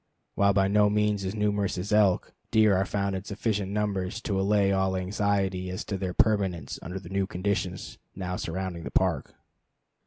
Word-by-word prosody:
While 100 0 +3
by 95 0 +3
no 105 +1 +4
means 105 -1 +1
as 95 +3 -3
numerous 105 -2 0
as 100 +4 -3
elk, 105 -4 +3 0.2
deer 110 -3 +5
are 95 +1 +1
found 100 -1 -1
in 95 - -4
sufficient 100 -1 -2
numbers 100 -1 -1
to 100 -4 -1
allay 100 0 +3
all 95 -1 +1
anxiety 95 -1 0
as 90 - -4
to 100 - -3
their 90 -2 -3
permanence 95 -9 +1
under 90 +3 -5
the 85 -3 -11
new 95 0 0
conditions 95 -1 -3 0.2
now 90 -1 -3
surrounding 90 0 -4
the - - -5
Park. - - 0
100 Hz, 180 wpm, -27 LUFS, 95-105 Hz, 0.2 s, deer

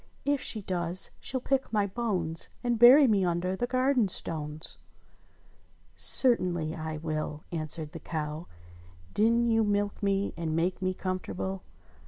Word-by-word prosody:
If 285 -1 +1
she 215 -3 -1
does 175 -1 -3
she'll 265 - -3
pick 270 +1 -1
my 210 -2 +1
bones. 185 -7 -2
And 240 -2 0
bury 260 +5 +9
me 210 -6 +2
under 180 +1 -1
the 245 +5 -2
garden 255 -2 +2
stones 155 -4 -6 0.7
!" - - -34
"Certainly 180 - +4
I 155 -1 -5
will," 155 -1 -4
answered 155 -1 -2
the 165 - -8
cow. 155 0 -5 0.7
"Didn't 230 +2 +2
you 225 0 +3
milk 205 -1 -1
me 200 0 0
and 160 -2 -2
make 175 +3 -1
me 185 0 -1
comfortable 185 0 -4
185 Hz, 145 wpm, -28 LUFS, 165-225 Hz, 0.7 s, bury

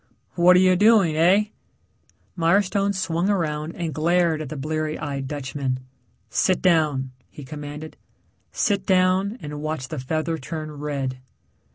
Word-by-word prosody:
"What 180 +1 +5
are - - +6
you 185 0 +5
doing, 205 -4 +5
heh?" 190 +7 +3 0.8
Mirestone 195 +3 +2
swung 185 0 -1
around 160 -5 -1
and 165 -3 -3
glared 165 +1 +2
at 150 - -6
the 155 - -6
bleary 155 +2 -2
eyed 140 -3 -4
Dutchman. 135 -2 -3 0.5
"Sit 185 -2 +1
down," 150 -7 +2 0.2
he 145 - -11
commanded. 150 +2 -8 0.5
"Sit 200 -3 0
down 185 +3 +2
and 150 0 -6
watch 155 -4 -4
the 155 - -4
feather 160 +5 -2
turn 155 +2 -6
red." 140 -3 -4
160 Hz, 140 wpm, -23 LUFS, 150-185 Hz, 0.8 s, are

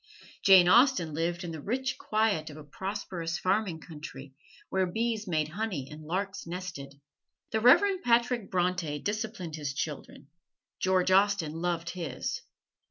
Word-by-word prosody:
Jane 190 -3 +7
Austen 235 - +5
lived 170 +3 -1
in 170 - -5
the 160 -2 -6
rich 260 - -2
quiet 215 -8 0
of 150 - -10
a 155 - -9
prosperous 175 0 -4
farming 185 -4 0
country, 145 -4 -10 0.4
where 190 -1 +1
bees 220 +2 -2
made 155 -3 0
honey 180 -7 -3
and 150 +1 -9
larks 190 +2 -3
nested. 170 -6 -7 0.5
The 220 - +1
Reverend 370 - +5
Patrick 235 - +2
Bronte 180 -4 0
disciplined 205 -3 -4
his 145 -3 -4
children: 145 -1 -5 0.5
George 185 0 +2
Austen 195 -5 +3
loved 170 0 -2
his. 175 -4 -4
180 Hz, 140 wpm, -29 LUFS, 160-210 Hz, 0.5 s, Jane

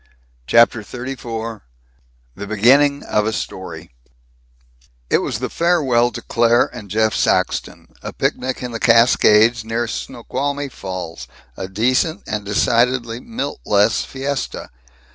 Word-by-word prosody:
CHAPTER 115 - +4
XXXIV 115 -1 -6 0.7
THE 100 - -7
BEGINNING 135 +7 +3
OF 105 0 0
A - - +1
STORY 95 -2 -6 1.2
It - - +4
was - - -3
the - - -3
farewell 140 -9 +2
to - - -7
Claire 120 0 +2
and 110 -5 -9
Jeff 110 +2 +1
Saxton, - - 0 0.2
a - - -6
picnic 130 0 -2
in 125 - -4
the 115 - -5
Cascades, 115 -1 +4
near 115 +1 -2
Snoqualmie 140 +5 -4
Falls 95 -7 -7 0.3
a 95 - -5
decent 130 - 0
and 105 -1 -3
decidedly 115 +3 +1
Milt 145 - -5
less 105 +1 +2
fiesta. 135 - -4
115 Hz, 125 wpm, -19 LUFS, 110-130 Hz, 1.2 s, CHAPTER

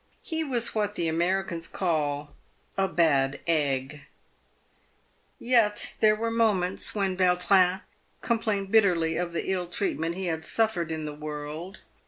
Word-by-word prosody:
He 320 -1 -2
was 245 -6 -1
what 210 -1 -1
the 170 - -1
Americans 170 +1 -1
call 150 -5 -2 0.2
" - - -39
a 195 0 +1
bad 145 -6 +2
egg 145 -3 0 0.7
" - - -37 0.6
Yet 230 -4 +3
there 215 -1 +5
were 230 +1 -2
moments 210 -6 +1
when 195 -2 0
Yautrin 185 0 +3 0.4
complained 215 -4 -1
bitterly 175 -7 +3
of 175 +1 -2
the 170 +2 -2
ill 180 -2 -1
treatment 170 -2 -2
he 190 0 -4
had 160 -2 -2
suffered 180 -5 0
in 160 -1 -4
the 150 - -5
world. 150 +4 -7
180 Hz, 145 wpm, -27 LUFS, 160-205 Hz, 0.7 s, there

